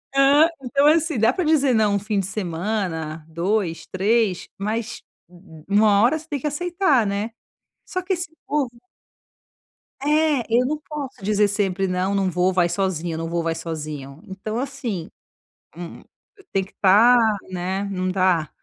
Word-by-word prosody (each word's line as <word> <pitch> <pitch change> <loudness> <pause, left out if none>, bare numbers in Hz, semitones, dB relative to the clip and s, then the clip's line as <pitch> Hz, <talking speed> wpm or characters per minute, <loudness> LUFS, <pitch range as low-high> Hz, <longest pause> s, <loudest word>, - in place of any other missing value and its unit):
E - - +3
hã. 285 +3 +6 0.2
Então 280 +3 +2
assim. 320 -3 +3
Dá 225 +3 +4
pra 365 - -2
dizer 285 -5 +3
não 210 -2 +3
um - - +1
fim 205 0 -1
de 195 - -1
semana, 175 -4 -3
2, 170 +1 -1
3 200 0 0
mas, 220 +3 -3 0.3
u 175 -2 -16
u - - -22
uma 205 0 +4
hora 245 +8 +4
você 320 0 -12
tem 290 -3 -3
que 300 - -2
aceitar, 335 - +1
né. 205 +3 -2 0.5
Só 370 - -3
que 375 +1 -1
esse 350 -3 -3 0.2
povo 290 -4 0 1.3
É, 300 -3 +2
eu 240 +2 +3
não 300 +4 -1
posso 285 -7 -7
dizer 210 +1 +3
sempre: 195 -2 0
"Não, 185 +2 -1
não 195 -1 +1
vou, 180 +1 +1
vai 175 -2 +2
sozinho. 175 -2 -1
Eu - - -4
não 165 0 -4
vou, 170 0 -1
vai 165 0 -1
sozinho." 155 -3 -6
Então 210 +4 -5
assim. 255 - -4 0.7
Hum, 170 0 -8 0.4
eu 395 - -19
tenho 195 -1 0
que 195 - -20
tá 215 +6 +6 0.3
né. 185 +2 -2
Não 185 -2 -2
dá. 185 -4 +1
205 Hz, 175 wpm, -22 LUFS, 180-265 Hz, 1.3 s, hã